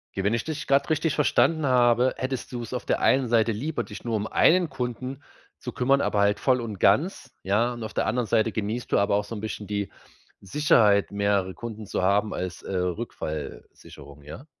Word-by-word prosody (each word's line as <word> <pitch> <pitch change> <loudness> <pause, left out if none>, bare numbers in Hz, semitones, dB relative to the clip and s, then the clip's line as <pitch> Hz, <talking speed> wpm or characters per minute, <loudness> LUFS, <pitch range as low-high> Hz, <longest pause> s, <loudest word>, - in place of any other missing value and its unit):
Ja, 95 - -2
wenn 100 +3 +1
ich 115 - -1
dich 155 -2 -5
grad 140 +3 +2
richtig 155 -1 +1
verstanden 155 +1 +2
habe, 125 0 +3
hättest 130 -1 -4
du's 120 -1 -6
auf 125 - -4
der - - 0
einen 130 -1 +3
Seite 115 -1 +2
lieber, 140 +9 -3
dich - - -10
nur 115 -2 -2
um 105 -1 -1
einen 175 +8 +3
Kunden 125 +2 -5 0.4
zu - - -6
kümmern, 135 +2 +2
aber 105 - 0
halt 100 +1 +2
voll 130 -2 +2
und 110 -5 -6
ganz, 145 - +2
ja? 110 +5 +1
Und 120 -1 -7
auf 110 -1 -6
der - - 0
anderen 120 +2 0
Seite 110 +3 +2
genießt 110 +3 -4
du - - +3
aber 100 0 +2
auch 105 - +1
so 110 +3 -7
'n 105 - -6
bisschen 110 -1 -6
die 100 -1 -3 0.5
Sicherheit, 105 -3 +3
mehrere 100 -2 0
Kunden 110 +3 -8
zu - - -3
haben, 100 +3 +1
als, 90 -1 -5
äh, - - -6
Rückfallsicherung, 80 -6 -6
ja? 75 - -10
115 Hz, 205 wpm, -25 LUFS, 100-130 Hz, 0.5 s, habe